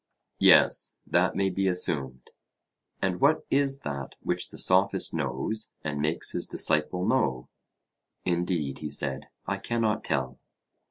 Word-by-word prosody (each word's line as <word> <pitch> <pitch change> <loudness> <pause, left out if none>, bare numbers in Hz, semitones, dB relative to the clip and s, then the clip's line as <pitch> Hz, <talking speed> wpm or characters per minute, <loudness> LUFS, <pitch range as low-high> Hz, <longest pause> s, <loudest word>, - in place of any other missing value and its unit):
Yes, - - +5
that - - +2
may 95 -1 +1
be 95 +1 0
assumed. 70 -8 -1 0.7
And 95 -2 -1
what 145 +3 +3
is 140 0 +2
that 70 -2 -5
which - - -2
the - - -11
Sophist - - +2
knows 110 0 -2
and 75 -2 -3
makes 75 +2 0
his - - -2
disciple 90 +4 +1
know? 65 -2 0 0.8
Indeed, 85 -6 -1
he 75 - -5
said, 70 -2 0 0.2
I 100 +1 -2
cannot 110 +1 -1
tell. 65 -1 -2
85 Hz, 130 wpm, -27 LUFS, 70-100 Hz, 0.8 s, Yes